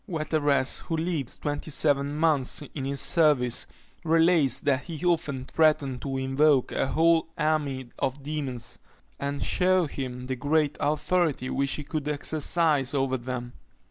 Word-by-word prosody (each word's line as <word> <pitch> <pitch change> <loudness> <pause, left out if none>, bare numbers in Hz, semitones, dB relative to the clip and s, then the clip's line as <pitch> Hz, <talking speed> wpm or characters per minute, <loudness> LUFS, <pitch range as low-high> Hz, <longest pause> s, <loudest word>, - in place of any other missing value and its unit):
Wetteras, 155 -5 0
who 165 - -1
lived 160 -6 -3
twenty 145 +1 -3
seven 145 -1 +1
months 150 -3 +1
in 135 -3 -4
his 140 0 -2
service, 145 -8 +2 0.4
relates 165 -4 +3
that 140 -1 0
he 165 -1 -6
often 140 -7 0
threatened 150 -5 +1
to 135 -1 -3
invoke 135 +1 +2
a - - 0
whole 165 +3 +3
army 145 -5 -1
of 135 +2 -2
demons, 135 -6 -5 0.4
and 140 0 -3
shew 185 -1 +2
him 125 -3 -5
the 130 0 -3
great 145 +3 +1
authority 150 -2 0
which 140 0 0
he 150 - -4
could 150 0 -4
exercise 150 -1 +1
over 135 -1 +1
them. 125 0 -5
145 Hz, 140 wpm, -26 LUFS, 135-155 Hz, 0.4 s, relates